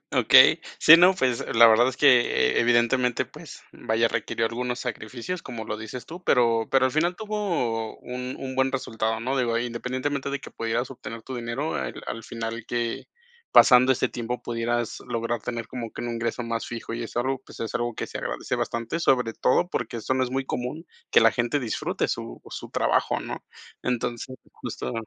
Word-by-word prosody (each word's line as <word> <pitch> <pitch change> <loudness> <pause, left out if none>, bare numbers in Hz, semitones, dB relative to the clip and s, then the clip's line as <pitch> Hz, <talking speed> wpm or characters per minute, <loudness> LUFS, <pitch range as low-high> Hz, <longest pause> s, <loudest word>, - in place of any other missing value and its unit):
Okey, - - +7 0.2
sí, 165 +2 +9
no, 180 +2 +6
pues, 130 -10 0 0.2
la 115 0 +9
verdad 115 +3 +5
es 130 - -4
que 125 -5 +4
e - - +4
evidentemente, 120 +1 +2
pues, - - -12
vaya, 115 +1 0
requirió 115 0 -2
algunos 125 +1 -3
sacrificios 125 - -5
como 115 -4 -7
lo 105 - -4
dices 115 +2 -8
tú, 175 +3 -9
pero 115 -3 +3
pero 130 -1 +4
al 130 - -2
final 170 +4 +1
tuvo 175 - -2
un 125 +1 -6
un 130 -1 -5
buen 130 0 +2
resultado, 110 -3 -2
¿no? 130 +4 -1
Digo, 115 -2 +1
independientemente 130 +4 -3
de 140 -1 -3
que - - -10
pudieras 115 +3 -2
obtener 115 -3 -8
tu 130 - -7
dinero, 120 +6 -3
al 65 -3 -4
al 115 - -5
final 115 0 -5
que 120 -1 -3 0.4
pasando 125 0 +7
este - - 0
tiempo 120 +1 -4
pudieras 120 0 -2
lograr 115 0 -2
tener 115 -2 -4
como 115 -3 -6
que - - -7
un 120 - -3
ingreso 115 +1 -2
más 115 -1 -3
fijo 115 -1 -6
y 120 - -4
es 115 - -8
algo, 130 +2 0
pues, - - -13
es 115 - -4
algo 120 -1 -1
que - - -4
se - - -7
agradece - - -3
bastante, 115 +7 -2
sobre 125 -7 +2
todo 175 +7 +2
porque 120 -7 -3
eso 130 - -1
no 130 0 +2
es 125 - -6
muy 135 +1 -1
común, 130 +7 -4 0.2
que - - +6
la 115 -1 +6
gente 120 +4 0
disfrute 115 -3 -2
su - - -5
su - - -7
trabajo, - - +1
¿no? - - -7 0.4
Entonces, 125 +1 -3 0.2
justo 65 - -6
120 Hz, 195 wpm, -25 LUFS, 115-130 Hz, 0.4 s, sí